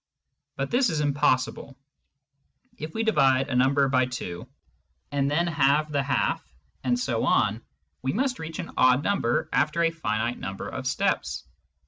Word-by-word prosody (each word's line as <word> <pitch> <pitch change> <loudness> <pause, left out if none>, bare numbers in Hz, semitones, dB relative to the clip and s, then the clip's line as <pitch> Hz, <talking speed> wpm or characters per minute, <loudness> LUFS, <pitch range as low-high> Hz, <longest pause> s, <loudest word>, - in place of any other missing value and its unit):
But - - -3
this 245 0 +3
is 160 -3 -1
impossible; 140 -2 0 1.0
if 155 +1 -6
we 225 - 0
divide 135 -12 +3
a 130 - -1
number 135 +2 +3
by 130 -1 +2
2, 90 -9 -6 0.6
and 140 -1 +1
then 165 +4 +1
halve 150 -1 +2
the 140 -1 +1
half, 140 0 0 0.4
and 125 -1 +1
so 120 -3 -1
on, 105 +2 +2 0.4
we 130 - -1
must 255 +2 -1
reach 160 0 -6
an - - -6
odd 130 +2 +4
number 165 -11 0
after 170 +2 +2
a 165 - +3
finite 115 -6 -2
number 95 0 -5
of - - -5
steps. - - -1
140 Hz, 155 wpm, -26 LUFS, 125-160 Hz, 1.0 s, odd